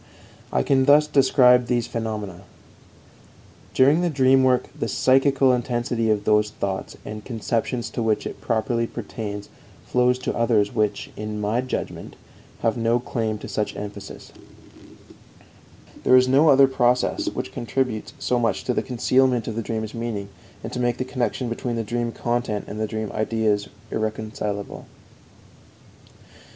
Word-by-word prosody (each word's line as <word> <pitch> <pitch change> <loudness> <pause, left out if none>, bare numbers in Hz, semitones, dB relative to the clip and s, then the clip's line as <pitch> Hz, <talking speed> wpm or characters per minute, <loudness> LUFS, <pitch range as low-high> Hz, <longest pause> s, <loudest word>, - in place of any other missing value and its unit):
I - - +1
can 135 -1 +3
thus 145 +2 +6
describe 130 -4 +4
these 120 -2 +1
phenomena: 105 -5 -4 1.3
_During 140 +6 +5
the 175 - +1
dream 135 -2 +4
work 130 -1 +2
the - - -3
psychical 135 +1 +3
intensity 120 -2 -1
of 105 -1 +1
those 105 0 +3
thoughts 100 -2 -4
and 105 0 -7
conceptions 115 +1 -2
to 120 - -3
which 110 -1 0
it - - -7
properly 115 0 0
pertains 105 -3 -6 0.4
flows 125 0 +2
to - - -1
others 115 -3 +2
which, 105 -3 -1
in 105 0 -5
my 105 +4 0
judgment, 130 - -5 0.5
have 115 +1 +1
no 115 +1 +2
claim 110 -3 -2
to - - -6
such 105 - -2
emphasis_. 100 0 -8 1.7
There 130 - +6
is 130 0 +4
no 140 +5 +5
other 135 -1 +7
process 125 -1 +1
which - - -5
contributes 120 -2 -2
so 125 - 0
much 115 -1 0
to 125 - 0
concealment 125 -1 +1
of 110 - -3
the 115 - -1
dream's 110 -1 -4
meaning 115 -4 -4 0.3
and - - -6
to - - -3
make 120 0 0
the 130 - -2
connection 130 0 -2
between 120 +1 -3
the 115 - -1
dream 120 +2 -2
content 120 -3 -2
and 110 0 -3
dream 110 -1 -4
ideas 110 -2 0 0.2
irrecognizable. 110 -2 -4
115 Hz, 145 wpm, -23 LUFS, 110-125 Hz, 1.7 s, other